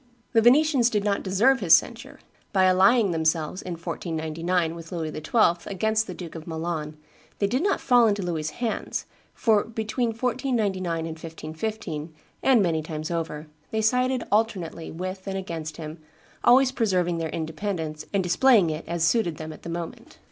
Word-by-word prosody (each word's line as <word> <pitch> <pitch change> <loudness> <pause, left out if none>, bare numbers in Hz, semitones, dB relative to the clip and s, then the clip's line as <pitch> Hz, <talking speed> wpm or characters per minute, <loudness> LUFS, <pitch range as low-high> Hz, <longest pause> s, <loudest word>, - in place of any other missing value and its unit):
The 225 - +5
Venetians 260 0 +5
did 210 -3 0
not 200 -1 0
deserve 225 +8 +3
his 170 -6 +7
censure. 230 +8 -3 0.4
By 190 -2 +4
allying 195 +3 +5
themselves, 160 +1 0
in 180 - -5
1499, 165 0 -2
with 165 -1 -10
Louis 160 -3 -3
XII. 170 +1 +1
against 220 +3 +1
the 180 - -6
Duke 170 -3 -8
of 160 0 -9
Milan, 160 -2 -4 0.4
they 200 - +1
did 250 +7 0
not 395 +2 +1
fall 245 -3 +5
into 205 -2 0
Louis's 160 -3 -2
hands, 235 -2 -3 0.3
for, 215 -3 +3
between 225 +2 -2
1499 225 -7 -1
and - - -4
1515, 160 0 -6 0.3
and 255 -6 +4
many 165 -3 +1
times 155 +1 -5
over, 160 -2 -3 0.2
they 220 - -1
sided 250 +2 +2
alternately 200 -7 0
with 185 +3 -6
and 195 0 -2
against 160 -5 -5
him, 155 0 -7 0.4
always 255 +2 +6
preserving 180 -8 0
their 160 -1 -2
independence 160 -1 -4
and 200 -2 +1
displaying 190 0 +4
it 155 +1 -5
as 170 -1 -1
suited 170 -4 +2
them 155 0 -6
at - - -14
the - - -8
moment. 200 - -7
185 Hz, 165 wpm, -25 LUFS, 160-225 Hz, 0.4 s, his